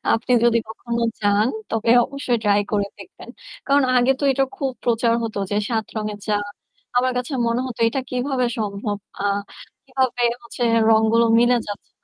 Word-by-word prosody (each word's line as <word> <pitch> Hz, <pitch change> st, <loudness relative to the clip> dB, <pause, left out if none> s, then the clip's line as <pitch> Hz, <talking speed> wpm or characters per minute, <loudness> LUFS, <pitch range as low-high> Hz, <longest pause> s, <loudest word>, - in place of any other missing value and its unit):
আপনি 235 Hz, +2 st, -1 dB
যদি 235 Hz, -1 st, +4 dB
কখনো 235 Hz, +1 st, -4 dB, 0.2 s
যান 205 Hz, +2 st, +2 dB, 0.2 s
তবে 225 Hz, 0 st, 0 dB
অবশ্যই 265 Hz, -3 st, -2 dB
ট্রাই 205 Hz, -1 st, +3 dB
করে 205 Hz, -1 st, +1 dB
দেখবেন। 375 Hz, -, -13 dB, 0.4 s
কারণ 280 Hz, +1 st, +4 dB
আগে 245 Hz, +1 st, +4 dB
তো -, -, -1 dB
এটা 270 Hz, +1 st, +2 dB
খুব 275 Hz, -7 st, -2 dB
প্রচার 230 Hz, 0 st, +2 dB
হত 225 Hz, -1 st, -4 dB, 0.2 s
যে 205 Hz, -, 0 dB
৭ 220 Hz, -2 st, 0 dB
রঙের 210 Hz, -1 st, -3 dB
চা। 210 Hz, -, +1 dB, 0.6 s
আমার 255 Hz, +1 st, +3 dB
কাছে 250 Hz, +3 st, -4 dB
মনে 235 Hz, +1 st, +1 dB
হতো 240 Hz, -3 st, -7 dB
এটা 265 Hz, +4 st, -2 dB
কিভাবে 255 Hz, 0 st, 0 dB
সম্ভব? 205 Hz, -1 st, -3 dB, 0.2 s
আ -, -, -2 dB, 0.6 s
কিভাবে 260 Hz, -2 st, -1 dB, 0.2 s
হচ্ছে 235 Hz, +1 st, -7 dB, 0.3 s
রংগুলো 220 Hz, +1 st, +4 dB
মিলে 240 Hz, +1 st, +4 dB
যাচ্ছে। 205 Hz, -1 st, -8 dB
235 Hz, 165 wpm, -21 LUFS, 220-250 Hz, 0.6 s, যদি